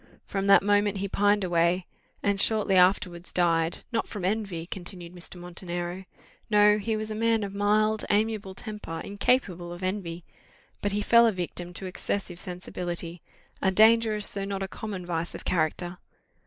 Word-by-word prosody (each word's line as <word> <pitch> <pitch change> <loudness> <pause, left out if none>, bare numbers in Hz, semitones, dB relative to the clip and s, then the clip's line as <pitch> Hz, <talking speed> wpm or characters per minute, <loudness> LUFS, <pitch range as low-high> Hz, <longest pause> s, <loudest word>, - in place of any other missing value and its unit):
From 195 0 -2
that 200 - +7
moment 205 0 +2
he 200 +1 -2
pined 205 +1 +2
away, 175 0 +2 0.4
and 200 -1 +1
shortly 215 -3 +2
afterwards 180 -1 +3
died: 165 -1 +1
not 225 -1 -1
from 200 -4 -5
envy," 195 -5 -2
continued 175 -1 -7
Mr. 180 +1 -9
Montenero; 175 +1 -5 0.4
"no, 210 0 +5
he 220 +2 -1
was 215 0 -4
a - - -1
man 225 0 +1
of 200 -1 -5
mild, 215 +1 +2
amiable 210 -2 0
temper, 210 -7 -6
incapable 200 -4 0
of 175 +1 -8
envy; 180 -3 -3 0.6
but 205 - 0
he 205 +1 -1
fell 235 +1 +6
a - - +3
victim 175 -2 -4
to 190 - -6
excessive 185 -1 -3
sensibility 175 -2 -5 0.4
a 190 - +3
dangerous, 220 +1 +4
though 200 - -4
not 195 0 -3
a - - -3
common 195 -2 -6
vice 170 -1 -3
of - - -9
character." 175 +1 -1
195 Hz, 165 wpm, -27 LUFS, 175-210 Hz, 0.6 s, that